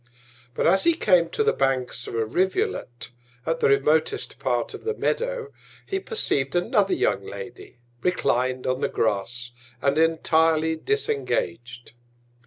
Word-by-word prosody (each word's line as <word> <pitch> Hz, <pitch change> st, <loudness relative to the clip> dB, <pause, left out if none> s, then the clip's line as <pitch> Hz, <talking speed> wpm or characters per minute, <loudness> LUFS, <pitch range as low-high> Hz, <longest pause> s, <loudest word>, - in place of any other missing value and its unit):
But -, -, 0 dB
as 190 Hz, +3 st, +4 dB
he 335 Hz, -1 st, +4 dB
came 175 Hz, -, +3 dB
to 440 Hz, -, 0 dB
the 445 Hz, -, +3 dB
Banks 130 Hz, -2 st, -1 dB
of -, -, -6 dB
a 115 Hz, -1 st, +1 dB
Rivulet, 185 Hz, -, -1 dB, 0.3 s
at 165 Hz, 0 st, -1 dB
the -, -, +3 dB
remotest 145 Hz, 0 st, +1 dB
part 125 Hz, -3 st, -1 dB
of -, -, -9 dB
the 445 Hz, 0 st, -2 dB
Meadow, 485 Hz, -1 st, -2 dB, 0.3 s
he 390 Hz, -, -2 dB
perceiv'd 140 Hz, -, 0 dB
another 195 Hz, +2 st, +2 dB
young 100 Hz, -, 0 dB
Lady, 100 Hz, +6 st, -9 dB, 0.2 s
reclin'd 130 Hz, -8 st, 0 dB
on 130 Hz, +1 st, -1 dB
the -, -, +1 dB
Grass, 115 Hz, +4 st, -2 dB, 0.3 s
and 140 Hz, +3 st, +1 dB
entirely 160 Hz, 0 st, +3 dB
disengag'd. 420 Hz, -, -2 dB
160 Hz, 140 wpm, -24 LUFS, 125-200 Hz, 0.3 s, as